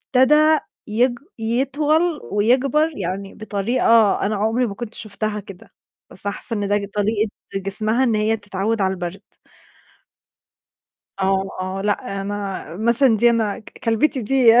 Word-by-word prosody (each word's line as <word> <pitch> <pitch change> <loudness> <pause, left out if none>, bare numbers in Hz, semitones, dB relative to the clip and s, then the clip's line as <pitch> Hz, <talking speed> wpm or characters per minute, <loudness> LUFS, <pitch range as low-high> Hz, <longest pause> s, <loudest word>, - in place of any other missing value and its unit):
ابتدأ 300 +4 +5 0.3
يك 240 +4 +2 0.3
يطول 290 +8 +1
ويكبر 265 +9 +2
يعني 195 +1 -4
بطريقة 220 +1 +2
أنا 210 +1 0
عمري 225 +5 +1
ما 200 - -6
كنت 235 0 -7
شُفتها 215 0 -4
كده، 195 -2 -13 0.4
بس 195 - -11
أنا 200 - -1
حاسة 230 - -6
إن 205 -1 -1
ده 205 - +2 0.2
طريقة 210 +1 0 0.3
جسمها 215 +5 0
إن 230 -4 +2
هي 215 +1 +1
تتعود 205 +2 -2
على 190 0 +1
البرد. 180 +2 -5 2.0
آه، 195 0 +1
آه، 185 +1 -3
لا، 195 -1 -1
أنا 200 -1 -4
مثلًا 235 +2 +3
دي 235 +2 +5
أنا 220 -3 0 0.3
كلبتي 235 +4 +1
دي 250 0 +5
215 Hz, 135 wpm, -21 LUFS, 200-245 Hz, 2.0 s, ابتدأ